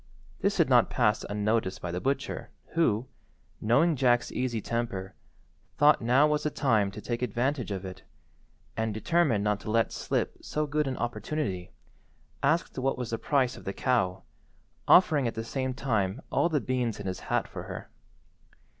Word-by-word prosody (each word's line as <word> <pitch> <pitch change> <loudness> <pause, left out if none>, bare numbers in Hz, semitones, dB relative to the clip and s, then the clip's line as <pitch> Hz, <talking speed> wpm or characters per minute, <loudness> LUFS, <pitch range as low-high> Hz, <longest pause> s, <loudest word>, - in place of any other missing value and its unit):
This - - +1
did - - +4
not - - +5
pass - - +2
unnoticed 105 -1 0
by 85 - -4
the 90 +1 -3
butcher, 135 +1 -2 0.2
who, 125 -9 +1 0.6
knowing 140 +10 +3
Jack's 120 -2 +2
easy 125 -3 -1
temper, 105 -5 -3 0.6
thought 150 +1 +5
now 125 +5 +4
was 150 0 +1
the 150 - 0
time 115 -9 +2
to 100 - -8
take 120 +2 -3
advantage 125 +2 -1
of 95 -1 -4
it, 95 -1 -8 0.7
and, 110 -1 -1
determined 135 -3 +2
not 105 -1 +1
to 110 - -7
let 115 +1 +2
slip - - -2
so 150 0 -2
good 150 0 0
an 130 - -2
opportunity, 110 - -3 0.7
asked 155 -1 +1
what 135 +1 0
was 125 -2 -4
the 115 - -2
price 135 -4 +1
of - - -11
the 95 - -4
cow, 110 -9 0 0.6
offering 150 -8 +6
at 115 - -3
the 110 - -3
same 130 +3 -2
time 110 -6 0
all 170 - +2
the 155 -3 +1
beans 125 -5 -1
in 100 - -6
his 95 -3 -3
hat - - -1
for - - -7
her. - - -8
120 Hz, 170 wpm, -28 LUFS, 105-140 Hz, 0.7 s, offering